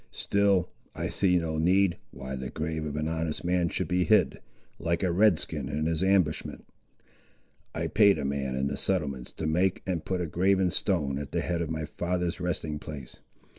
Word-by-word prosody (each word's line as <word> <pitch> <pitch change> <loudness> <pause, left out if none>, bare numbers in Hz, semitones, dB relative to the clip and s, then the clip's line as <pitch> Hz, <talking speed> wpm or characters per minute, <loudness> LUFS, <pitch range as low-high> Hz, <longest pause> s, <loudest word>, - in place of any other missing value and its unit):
Still 100 -3 +2 0.2
I - - -2
see 90 -2 +2
no 80 -2 -1
need, 90 +2 +3
why 65 0 -6
the 65 0 -5
grave 80 0 -3
of 75 -1 -4
an 75 +1 -1
honest 80 -1 -2
man 90 -1 +2
should 95 - -2
be 90 +2 +2
hid, 110 +3 +3 0.4
like 85 +1 -1
a 90 - +2
Red 95 0 +5
skin 75 -5 -3
in 75 +1 -1
his 80 -1 0
ambushment. 95 -5 +1 1.1
I - - -1
paid 100 -1 +5
a - - -3
man 70 -1 -2
in 65 +1 0
the 70 - -2
settlements 70 -9 -1
to 80 - -5
make 90 +4 +1
and 90 -4 -2
put 95 -1 -2
a 90 - -1
graven 95 +3 +2
stone 75 -10 0
at 70 0 -7
the 85 - +1
head 85 +1 -1
of 80 - -2
my 80 -1 -2
father's 90 +2 -2
resting 80 -4 -2
place. 75 -5 -8
85 Hz, 195 wpm, -28 LUFS, 75-90 Hz, 1.1 s, Red